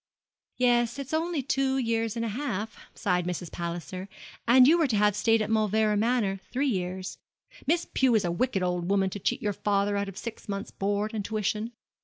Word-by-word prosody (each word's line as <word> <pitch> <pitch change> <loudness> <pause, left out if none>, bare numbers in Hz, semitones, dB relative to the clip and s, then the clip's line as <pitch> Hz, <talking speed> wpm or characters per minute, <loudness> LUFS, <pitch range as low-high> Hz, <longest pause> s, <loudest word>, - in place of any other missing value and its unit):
'Yes, 240 0 +2
it's 275 +1 -6
only 320 -2 0
two 270 0 +1
years 230 -3 0
and 230 0 -1
a - - -2
half,' 220 -3 -3 0.2
sighed 180 -1 0
Mrs. 175 -1 -4
Palliser, 175 +3 -5 0.4
'and 250 +2 +7
you 335 +4 +5
were 320 - +3
to 235 - 0
have 210 -1 +3
stayed 225 +1 +3
at 215 - -4
Mauleverer 215 0 +2
Manor 210 -3 +1
three 270 +3 +1
years. 185 -3 -3 0.5
Miss 340 +3 +2
Pew 260 -3 +3
is 205 -4 +2
a 175 - 0
wicked 200 0 0
old 180 0 -1
woman 195 -1 +2
to 205 - -5
cheat 220 - -1
your 205 -1 0
father 200 +1 0
out 200 0 -1
of 195 - -11
six 230 -2 -7
months' 200 0 -4
board 205 +2 -1
and 215 -2 -2
tuition. 215 +2 -2
215 Hz, 200 wpm, -28 LUFS, 195-245 Hz, 0.5 s, and